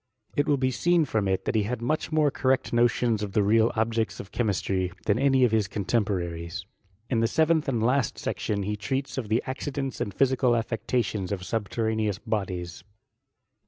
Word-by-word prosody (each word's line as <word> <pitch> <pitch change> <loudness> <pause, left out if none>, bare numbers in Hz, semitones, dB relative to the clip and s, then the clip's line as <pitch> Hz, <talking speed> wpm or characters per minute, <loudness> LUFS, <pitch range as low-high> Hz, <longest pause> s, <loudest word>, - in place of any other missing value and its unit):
It 145 - +1
will 145 - +3
be 130 0 +1
seen 170 +6 +2
from 110 -7 0
it 95 0 0
that - - 0
he 110 - +3
had 115 +4 -2
much 155 +7 -1
more 155 -2 +3
correct 130 -1 0
notions 120 -2 +2
of 100 -2 -4
the 105 - +3
leal 110 +3 +4
objects 115 0 0
of 95 - -8
diemistry, 95 -4 0
than 105 +2 +2
any 135 -1 +4
of 120 - +4
his 110 -3 +2
oontemporaries. 90 -5 -2 0.5
In 115 - +2
the 115 - +3
serenth 160 +4 +2
and 115 -4 0
last 125 0 +1
section 100 -1 -2
he 105 +2 -2
treats 130 +7 -3
of 110 -5 -6
the 110 +2 +2
accidents 135 -1 -4
and 100 - -1
physical 130 +2 +2
afiections 115 -3 -1
of 95 -3 -3
subtenaneous 110 0 -1
bodies. 90 -6 -4
115 Hz, 180 wpm, -26 LUFS, 100-130 Hz, 0.5 s, leal